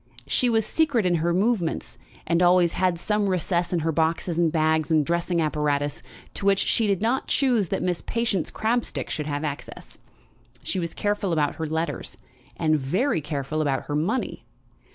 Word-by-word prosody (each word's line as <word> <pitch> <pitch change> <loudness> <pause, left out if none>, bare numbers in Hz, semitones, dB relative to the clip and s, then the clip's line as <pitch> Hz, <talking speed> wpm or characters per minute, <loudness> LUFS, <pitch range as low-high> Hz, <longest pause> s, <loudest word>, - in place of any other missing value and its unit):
She 250 - +2
was 225 -2 +2
secret 280 - +1
in 180 - +3
her 170 +1 +1
movements, 190 -2 0 0.3
and 170 +1 +1
always 175 -1 +4
had 185 -2 +1
some 210 +1 0
recess 175 -1 0
in 175 -2 0
her 165 +1 0
boxes 165 +2 0
and 165 -2 +3
bags 160 0 +1
and 155 -2 +3
dressing 170 +1 0
apparatuses 150 -2 0 0.3
to - - -4
which 195 -1 +5
she 220 +2 +2
did 200 0 0
not 245 +4 0
choose 240 - +2
that - - -1
Miss 180 -2 -1
Patience 230 -7 -1
Crabstick 235 +2 -2
should 150 -2 -3
have 145 0 -2
access. 145 -2 -7 0.6
She 190 - -1
was 170 -2 -4
careful 205 -2 -1
about 150 -3 0
her 160 - -3
letters, 160 +2 -3 0.4
and 155 -2 +2
very 180 - 0
careful 150 +1 -3
about 140 -3 0
her 145 - -4
money. 180 - -1
170 Hz, 175 wpm, -25 LUFS, 155-205 Hz, 0.6 s, which